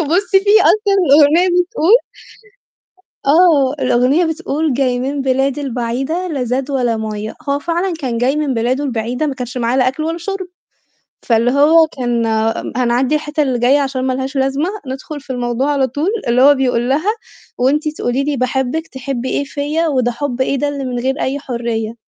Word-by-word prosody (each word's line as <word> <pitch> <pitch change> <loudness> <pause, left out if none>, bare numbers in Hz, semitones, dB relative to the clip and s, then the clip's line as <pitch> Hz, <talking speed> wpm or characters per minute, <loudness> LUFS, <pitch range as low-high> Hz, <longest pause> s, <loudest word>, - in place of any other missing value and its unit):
بُصّي 385 +3 +2
في 415 +2 +4
أصلًا 420 -2 +3 0.2
الأغنية 305 +5 +5 0.2
بتقول 365 +5 +3 1.3
آه، 290 -3 +4
الأغنية 255 +6 +2
بتقول 320 -2 -2
"جاي 250 -1 0
من 275 +2 -2
بلاد 270 +1 0
البعيدة 270 +6 -3
لا 280 -6 -2
زاد 255 +3 -2
ولا 245 -4 0
مَيّة" 215 0 -5
هو 280 0 +1
فعلًا 345 +5 -2
كان 250 -6 -3
جاي 255 +4 +1
من 300 -3 -1
بلاده 250 +5 0
البعيدة 245 +2 -2
ما 280 - -2
كانش 250 -1 -7
معاه 235 +1 0
لا 255 -1 +3
أكل 265 +4 -4
ولا 330 +2 -2
شرب، 380 +2 -5 0.8
فاللي 235 +1 +2
هو 315 +4 +5
كان 240 -2 0 0.5
هنعدّي 250 +3 +1
الحتّة 300 0 -1
اللي 255 -3 -1
جاية 255 +4 +3
عشان 270 -2 -2
ما 260 - 0
لهاش 265 +2 -4
لازمة 270 +5 0 0.2
ندخُل 270 +3 -6
في 280 - -22
الموضوع 245 +3 -1
على 275 -2 +1
طول 290 +8 -2 0.2
اللي 240 +2 +3
هو 285 +2 +7
بيقول 250 -2 0
لها 310 +10 +1 0.5
"وأنتِ 285 +5 +1
تقولي 245 +3 -1
لي 290 -1 -2
باحبِّك 265 +5 -1
تحبّي 260 -1 -5
إيه - - -1
فيّا 295 +4 -2
وده 255 -5 +1
حُب 255 +1 -3
إيه 260 - 0
ده 290 - -1
اللي 285 -1 -4
من 250 -1 -3
غير 265 +3 -2
أي 275 +2 -1
حرية" 235 -4 -3
270 Hz, 180 wpm, -16 LUFS, 250-300 Hz, 1.3 s, هو